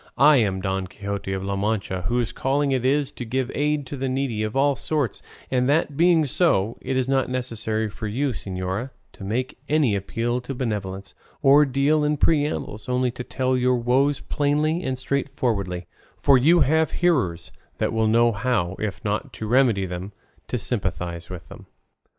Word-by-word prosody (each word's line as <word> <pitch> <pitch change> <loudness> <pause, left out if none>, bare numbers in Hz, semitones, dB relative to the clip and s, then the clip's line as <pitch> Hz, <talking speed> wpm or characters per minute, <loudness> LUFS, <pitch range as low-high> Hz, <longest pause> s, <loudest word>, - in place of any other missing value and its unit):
I 150 0 +7
am 100 -5 +1
Don 95 -1 -2
Quixote 100 0 -5
of 95 0 -2
La 100 0 -2
Mancha, 100 -3 -2
whose 120 +1 0
calling 140 +1 0
it 130 -2 0
is 140 +2 +1
to - - -7
give 130 +2 -2
aid 150 0 0
to 135 - -6
the 135 0 -2
needy 130 -4 -1
of 110 +2 -3
all 140 +1 +3
sorts; 145 -3 -2 0.3
and 125 0 +2
that 145 -1 +1
being 165 0 +4
so, 120 - +1
it 130 - -2
is 130 -1 0
not 135 -1 +1
necessary 115 -3 -2
for 105 +1 -6
you, 135 +7 0
señora, 95 +1 -4 0.2
to - - -11
make 125 +6 -3
any 145 -8 +3
appeal 115 +5 -2
to 130 +2 -6
benevolence, 100 -6 -4 0.3
or 145 +2 +7
deal 140 +3 +2
in 150 0 +1
preambles, 145 -9 0
only 125 0 +1
to 125 0 -7
tell 130 0 -1
your 125 0 +2
woes 130 +4 +2
plainly 150 +3 0
and 130 -6 -2
straightforwardly: 120 -9 -2 0.3
for 140 - +5
you 160 +7 +5
have 155 +3 +3 0.2
hearers 95 - +1 0.3
that - - -1
will 110 -1 +2
know 115 +2 +4
how, 100 -5 -1
if 105 +1 -4
not 105 +1 -2
to 110 - -6
remedy 120 -5 +3
them, 90 +2 -6 0.3
to - - -2
sympathise 90 -6 -3
with 90 -3 -8
them." - - -13
125 Hz, 180 wpm, -24 LUFS, 100-140 Hz, 0.3 s, I